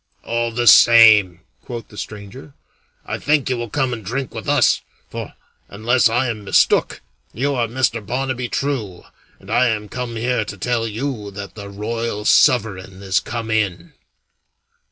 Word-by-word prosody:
"All 120 0 -1
the 120 +1 -2
same," 110 -5 +7 0.2
quoth 120 -2 -8
the - - -15
stranger, 105 +8 -9 0.5
"I - - -4
think 145 -3 +1
you - - +1
will 120 -1 -5
come 130 0 -1
and 110 -2 -6
drink 130 +7 -4
with 110 - -6
us; 145 -5 +3 0.3
for, - - -7 0.3
unless 115 +4 +2
I 125 +3 +1
am 110 -3 -4
mistook, 100 - +2 0.3
you 140 +5 0
are 120 -3 0
Mr. 120 -2 -1
Barnaby 125 +2 -3
True, 115 -11 -3 0.4
and - - -12
I 125 - +3
am 105 -2 -2
come 125 -2 -5
here 125 +2 0
to - - -8
tell 120 -2 -1
you 115 -1 -4
that 100 -1 -7
the 100 -2 -9
Royal 105 +1 -4
Sovereign 100 -9 +2
is 95 -1 +1
come 115 +3 -5
in." 100 -5 -2
115 Hz, 160 wpm, -19 LUFS, 105-125 Hz, 0.5 s, same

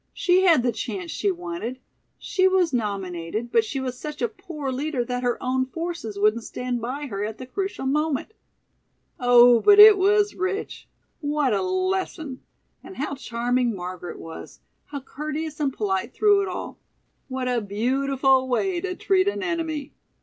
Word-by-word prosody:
"She 365 0 +3
had 325 -9 +5
the 245 - +2
chance 340 - -5
she 405 - 0
wanted. 340 -8 -4 0.4
She 375 -1 +1
was 370 -5 +2
nominated, 200 -1 -3
but 230 - +4
she 245 +5 -4
was 255 -1 -4
such 300 -1 -6
a 240 - +1
poor 280 +4 -6
leader 265 -1 -2
that 245 +1 -3
her 245 -1 0
own 260 0 0
forces 330 -9 -5
wouldn't 215 +3 +2
stand 245 0 -4
by 265 +5 -4
her 205 -6 -4
at 215 +1 -4
the 255 - -8
crucial 385 +2 -4
moment. 300 +6 -1 0.9
Oh, 245 -1 +7
but 410 - +6
it 420 -1 +10
was 410 +2 +3
rich! 375 +3 -4 0.3
What 290 -4 0
a 200 - +1
lesson! 370 -6 -2 0.4
And 380 - -11
how 280 +1 -3
charming 245 -2 -1
Margaret 180 -1 -6
was! 165 0 -10 0.3
How 285 -2 -7
courteous 305 +3 -5
and 285 -3 +1
polite 210 0 -2
through 410 -1 +4
it 395 - -2
all. - - -6 0.5
What 260 -1 -3
a 245 -2 +1
beautiful 260 +5 +1
way 345 +8 0
to 365 0 -3
treat 380 0 +2
an 405 -1 -1
enemy!" 320 -5 -3
270 Hz, 165 wpm, -24 LUFS, 240-350 Hz, 0.9 s, it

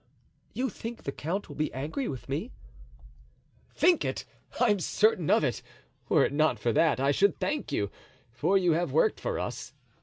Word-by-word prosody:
"You 255 -1 -1
think 230 +3 -7
the 140 - -3
count 175 +9 -3
will - - -10
be 155 0 -1
angry 155 - -3
with 130 - -6
me?" 155 - -3 1.2
"Think 355 -2 +4
it? - - -3 0.3
I'm 210 -5 +3
certain 185 -2 +2
of - - +4
it; 130 -4 -1 0.5
were - - +5
it - - -2
not 155 +2 +2
for 120 - 0
that, 160 -1 +3
I 135 +1 +3
should 200 +8 +3
thank 300 - -2
you, 100 -7 -1 0.4
for 190 +11 +2
you 180 -3 +3
have 170 +2 0
worked 475 -3 +2
for - - -2
us. - - -5
175 Hz, 180 wpm, -28 LUFS, 140-230 Hz, 1.2 s, were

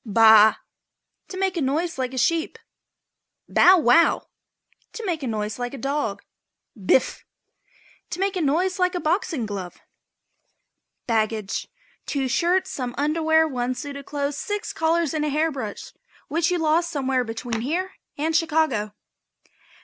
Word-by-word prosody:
### - - -58
BAA. 220 -1 +7 0.7
To 375 - -8
make 380 -1 0
a 335 - -1
noise 300 +3 -1
like 255 -1 -1
a 260 - -7
sheep. 325 +6 0 0.9
BOW 370 +1 +6
WOW. 315 +1 +4 0.7
To 450 -1 -6
make 340 -5 -2
a 265 - -3
noise 215 -1 -3
like 245 +2 -4
a - - -7
dog. 270 -8 -2 0.5
BIFF. 215 +4 +1 0.9
To 350 - -5
make 390 0 0
a 365 - -1
noise 355 +6 0
like 365 0 +1
a - - -1
boxing 320 - -1
glove. 195 -4 -6 1.3
BAGGAGE. 220 -3 -1 0.4
Two 275 -2 -1
shirts, 365 +7 +1
some 250 -2 -4
underwear, 320 +2 +2
one 255 -3 -2
suit 285 +2 -6
of 280 -1 -9
clothes, 285 -1 -3
six 415 +1 -4
collars 325 -1 +1
and 310 -1 -1
a 300 - 0
hair 310 +3 +1
brush 225 -8 -7 0.4
which 325 +1 +1
you 360 - +1
lost 325 +1 +1
somewhere 265 -5 0
between 225 0 -4
here 350 +9 -2 0.3
and 315 +2 -1
Chicago. 310 -11 +1
295 Hz, 150 wpm, -23 LUFS, 245-335 Hz, 1.3 s, BAA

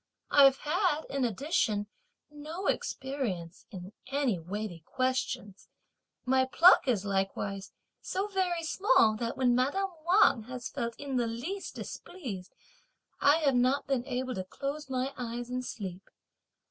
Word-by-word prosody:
I've 275 -2 +7
had, 315 0 +1
in 275 -1 0
addition, 225 - 0 0.5
no 310 +6 -7
experience 220 -11 -3
in 190 0 -9
any 265 -8 0
weighty 190 +1 -5
questions; 245 0 -2 0.6
my 260 0 +3
pluck 335 +5 +6
is 215 -6 +1
likewise 195 0 -2 0.3
so 385 +2 -2
very 370 -4 -1
small 325 - +4
that 230 +1 -3
when 250 -2 +3
madame 290 +11 +1
Wang 350 - +5
has 250 0 -6
felt 235 -1 -3
in 275 -2 -3
the 240 -1 +1
least 305 +13 -5
displeased, 225 - -7 0.7
I 295 +3 +5
have 280 -3 +3
not 255 +3 +2
been 265 -3 0
able 255 0 -2
to 190 - -3
close 275 +9 -5
my 260 +1 -1
eyes 240 0 -5
and 255 0 -2
sleep. 190 -6 -7
255 Hz, 135 wpm, -30 LUFS, 215-290 Hz, 0.7 s, I've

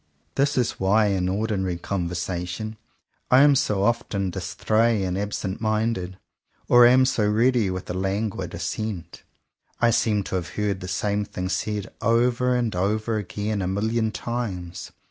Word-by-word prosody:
This 140 +1 +1
is 125 -2 0
why 105 +3 +3
in 90 -2 0
ordinary 95 -3 -1
conversation 90 +3 -3 0.5
I 130 +1 +7
am 145 -1 +6
so 105 -7 +1
often 100 -4 0
distrait 110 +3 +1
and 90 -1 -2
absent 100 0 -3
minded, 110 -4 -1 0.5
or 120 -1 +8
am 130 +1 +5
so 115 -6 +1
ready 115 -1 +3
with 90 -1 -5
a - - -3
languid 95 +3 -2
assent. 95 -6 -4 0.6
I 120 0 +4
seem 105 -2 +2
to 95 - -4
have 85 -2 -4
heard 105 -2 0
the 90 - -7
same 105 +2 -1
thing 90 -2 -5
said 105 +1 -3
over 120 +2 +2
and 120 -5 0
over 110 +4 0
again 105 +1 -3
a 90 - -1
million 110 +4 0
times. 100 -7 -5
105 Hz, 150 wpm, -24 LUFS, 95-115 Hz, 0.6 s, or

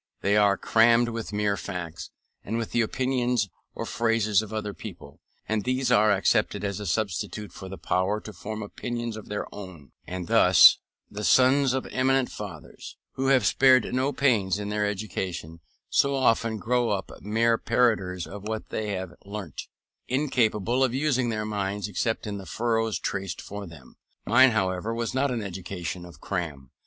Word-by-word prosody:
They 100 +1 +2
are 100 -2 +4
crammed 115 +1 +4
with 115 -2 -5
mere 105 -1 0
facts, 90 -5 -6 0.3
and 110 +3 -3
with 115 -1 -3
the 120 - +2
opinions 125 -2 0 0.3
or - - -4
phrases 115 -3 +2
of 110 -1 -8
other 105 -2 -3
people, - - -10 0.3
and 110 -1 0
these 130 +1 0
are 105 +1 +5
accepted 100 +1 +1
as 100 -1 -2
a 105 - -5
substitute 105 +2 -2
for 95 -1 -9
the 95 - -7
power 95 +3 0
to 110 - -9
form 110 +1 -6
opinions 120 +2 -4
of 110 - -9
their 105 - -3
own; 95 -8 -10 0.2
and 90 -1 -5
thus - - +7 0.3
the 105 +1 -6
sons 130 +3 +4
of 130 - -2
eminent 130 0 +1
fathers, 95 -7 -9
who 135 0 -2
have 135 -2 +4
spared 130 -3 +4
no 130 +2 +1
pains 105 -10 +2
in 105 0 -4
their 105 0 0
education, 95 -5 -4 0.3
so 140 0 +2
often 115 -4 +2
grow 120 +3 +1
up 100 -2 -2
mere 115 +3 +2
parroters 110 -7 +1
of 100 0 -9
what 110 0 -4
they 105 -2 -3
have 95 -2 -4
learnt, 100 -6 -7 0.4
incapable 125 -3 +1
of 130 -1 +1
using 130 -4 +1
their 110 -1 -2
minds 100 -1 -2
except 110 +3 -2
in 100 -1 -4
the 95 - -10
furrows 115 +2 0
traced 95 -2 -4
for 100 -1 -7
them. 75 -6 -14 0.3
Mine, 130 +2 +6
however, 100 0 -1
was 115 +1 -2
not 135 +2 +1
an 120 -4 -2
education 90 -2 -5
of 85 -5 -13
cram. 75 -10 -4
105 Hz, 170 wpm, -26 LUFS, 95-120 Hz, 0.4 s, thus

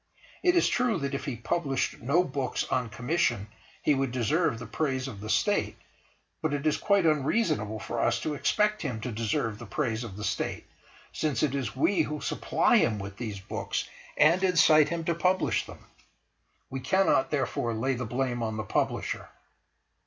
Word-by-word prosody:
It 355 0 +3
is 345 - +4
true 245 -4 +1
that 140 -2 -3
if 140 - -3
he 135 - -3
published 135 +3 -1
no 140 +9 +3
books 135 -5 -2
on 125 -3 0
commission 120 - 0 0.3
he 150 - +4
would 135 -2 0
deserve 130 +3 +1
the 115 - -7
praise 135 -4 -2
of 105 -7 -8
the 110 - -6
State, 205 - +1 0.6
but 155 -2 0
it 140 +1 -4
is 155 - +2
quite 200 -3 +2
unreasonable 150 - +1
for - - -4
us 115 0 +2
to 155 - -2
expect 210 +8 +1
him 125 -7 -3
to 125 - -4
deserve 110 -1 -1
the 120 - -9
praise 115 0 -1
of 105 -5 -8
the 105 - -6
State, - - -2 0.5
since 150 -5 -1
it 145 -3 +1
is 135 -3 -3
we 170 +6 +3
who 150 -1 -2
supply - - +2
him 110 - +2
with 100 0 -7
these 110 -5 -5
books 95 - -3 0.3
and 170 +5 +5
incite 160 -4 +5
him 170 0 -2
to 170 - +1
publish 180 +3 +1
them. - - -12 0.9
We 135 - -3
cannot, 190 +2 +2
therefore, 125 -5 -1
lay 130 +5 0
the 125 0 -3
blame 120 0 -1
on 110 -1 -2
the 110 - -2
Publisher. 95 - -2
135 Hz, 180 wpm, -28 LUFS, 115-160 Hz, 0.9 s, and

